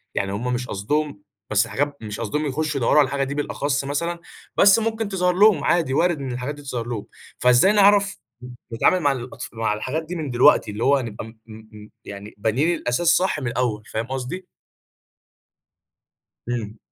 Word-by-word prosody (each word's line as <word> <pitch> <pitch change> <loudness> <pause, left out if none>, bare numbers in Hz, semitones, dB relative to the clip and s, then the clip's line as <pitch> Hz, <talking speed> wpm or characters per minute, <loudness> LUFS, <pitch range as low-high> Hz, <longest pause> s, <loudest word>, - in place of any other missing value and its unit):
يعني 100 0 -1
هم 125 +5 -2
مش 125 +1 -3
قصدهم 130 +4 -2 0.3
بس 105 +2 +2
حاجات 140 +6 -2
مش 105 -2 -6
قصدهم 135 +7 -2
يخُشّوا 150 +1 -2
يدوّروا 115 - +3
على 145 - +6
الحاجة 135 +1 -1
دي 135 +1 -3
بالأخص 145 -1 -1
مثلًا، 170 +5 -2 0.4
بس 200 +2 +6
ممكن 225 -1 -2
تظهر 180 -2 +1
لهم 195 -4 +5
عادي، 165 -6 +1
وارد 170 +1 +2
إن 135 -2 -4
الحاجات 125 +4 -4
دي 145 - -12
تظهر 125 -4 -5
لهم. 115 -4 -4 0.3
فإزاي 125 +9 +5
نعرف 200 -1 +4 0.5
نتعامل 185 +10 +3
مع 145 -5 +2
الأطف 125 -2 -6
مع 110 -1 -1
الحاجات 155 +9 -3
دي 175 +3 -6
من 155 -4 -4
دلوقتي، 120 -3 +4
اللي 105 +3 -4
هو 140 +1 +4
نبقى 110 -3 -6
م 110 0 -14
م 110 -1 -13 0.2
م 105 - -15 0.2
يعني 100 +1 -9
بانيين 130 +12 +1
الأساس 145 +7 -1
صح 180 -3 +3
من 130 - -4
الأول؟ 120 -3 -1
فاهم 110 +1 -4
قصدي؟ 135 +8 -5 2.0
إمم. 115 -3 -4
135 Hz, 180 wpm, -22 LUFS, 115-160 Hz, 2.0 s, على